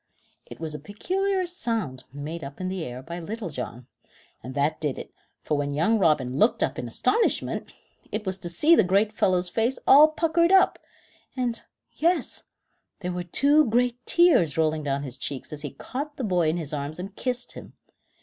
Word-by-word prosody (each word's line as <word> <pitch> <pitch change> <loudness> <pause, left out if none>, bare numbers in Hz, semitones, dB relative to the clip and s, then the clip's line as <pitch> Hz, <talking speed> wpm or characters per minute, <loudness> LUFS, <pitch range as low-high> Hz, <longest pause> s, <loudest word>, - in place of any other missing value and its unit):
It - - -11
was 160 -1 -4
a 150 - -5
peculiar 375 - -1
sound 225 - -3
made 150 +4 -6
up 140 +1 -8
in 185 0 -2
the 185 -2 -3
air 125 -1 -7
by 170 +4 -6
Little 205 +1 -5
John, 125 -2 -6 0.6
and 130 +2 -8
that 145 +3 0
did 150 -4 -1
it, - - -9 0.3
for 150 - 0
when 145 0 -2
young 215 +9 +2
Robin 145 -7 +2
looked 220 - +3
up - - -2
in - - -4
astonishment, 460 - 0 0.4
it 215 0 -3
was 190 0 -2
to 175 - -5
see 300 - +5
the 225 - +5
great 200 +4 +2
fellow's 185 -3 +2
face 230 +7 0
all 290 +3 +9
puckered 335 +2 +2
up, 385 0 +5 0.6
and 240 -2 -1 0.3
yes, 340 +3 0 0.6
there 180 -1 -3
were 180 0 -3
two 285 - +4
great 245 +1 +1
tears 320 - +4
rolling 155 -1 +1
down 140 -1 -2
his 130 -3 -7
cheeks 140 +3 -4
as 150 - -6
he 145 - -4
caught 290 - -6
the 265 - -3
boy 180 -6 +2
in 160 - 0
his 155 -3 -4
arms 145 +1 -3
and 190 +2 -7
kissed 250 -1 -2
him. - - -10
185 Hz, 190 wpm, -26 LUFS, 150-250 Hz, 0.6 s, all